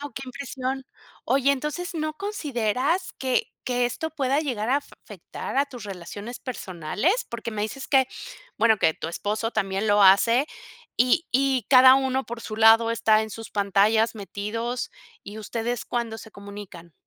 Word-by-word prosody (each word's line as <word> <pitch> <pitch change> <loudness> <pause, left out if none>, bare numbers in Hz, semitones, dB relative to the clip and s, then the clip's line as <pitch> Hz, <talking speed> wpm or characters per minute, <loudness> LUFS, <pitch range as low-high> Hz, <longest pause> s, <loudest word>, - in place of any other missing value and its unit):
Guau. 290 -3 -7
Qué 270 - -5
impresión. 260 +1 -4 0.4
Oye, 275 0 +3
entonces, 300 +6 -4
¿no 310 -1 -2
consideras 300 - -1
que 260 -2 0 0.2
que 245 -1 +1
esto 320 +6 -4
pueda 280 -1 0
llegar 240 -7 -2
afe 285 +1 -1
afectar - - -7
a 280 +1 +3
tus 245 -5 -10
relaciones 200 +5 -7
personales? 210 - -2
Porque 230 -1 -5
me 210 -1 -2
dices 265 +5 -5
que, 265 -2 +3 0.5
bueno, 220 -1 +5
que 160 - +3
tu - - -7
esposo 210 +6 -2
también 195 0 -1
lo 205 0 +4
hace 230 +8 +5 0.5
y 255 +8 +3
y 265 -3 +2
cada 260 0 +9
uno 265 0 0
por 235 0 -6
su 215 -1 -6
lado 225 +1 +6
está 220 -2 +3
en 220 - -6
sus 225 +2 -8
pantallas 210 +3 +2
metidos 225 +4 -4 0.3
¿y 205 +2 -9
ustedes 230 +2 -3
cuándo 230 -2 -3
se 220 - -11
comunican? 200 -4 -10
235 Hz, 160 wpm, -25 LUFS, 210-270 Hz, 0.5 s, cada